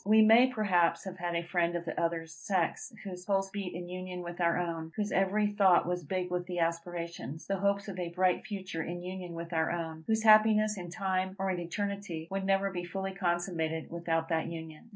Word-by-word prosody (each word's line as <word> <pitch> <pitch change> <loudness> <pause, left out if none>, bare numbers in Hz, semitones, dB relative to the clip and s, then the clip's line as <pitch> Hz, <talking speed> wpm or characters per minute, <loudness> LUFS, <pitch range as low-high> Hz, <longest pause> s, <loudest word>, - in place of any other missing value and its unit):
We 215 +2 +6
may, 225 +4 +7
perhaps, 180 -8 +2
have 190 -1 -7
had 175 0 -2
a 170 - 0
friend 175 0 0
of 170 0 -3
the 165 - -2
other 165 -1 0
sex, 170 +7 -2
whose 180 -2 -7
pulse 195 0 0
beat 195 -3 -4
in 175 0 -5
unison 180 0 -5
with 175 +1 -6
our 170 0 +3
own; 165 -2 -3
whose 210 -1 -1
every 195 +2 +2
thought 195 -4 +5
was 180 0 -2
big 185 -2 -2
with 180 0 -2
the 180 -1 -4
aspirations, 170 -4 -3
the 195 -1 -1
hopes 200 +1 +1
of 190 -2 -5
a 175 -1 -2
bright 180 +1 +2
future 190 -5 -4
in 175 +2 -5
union 180 -1 -6
with 170 +1 -6
our 160 -1 +2
own; 160 -2 -4
whose 220 0 +2
happiness 215 -1 +6
in 175 -3 -6
time 190 0 -1
or 195 0 0
in 180 - -2
eternity, 180 -2 -4
would 195 0 -2
never 195 0 +2
be 175 -2 -4
fully 190 +2 -4
consummated 175 -3 -1
without 165 -1 -1
that 160 -1 +1
union. 160 +4 -8
180 Hz, 215 wpm, -31 LUFS, 170-195 Hz, -, may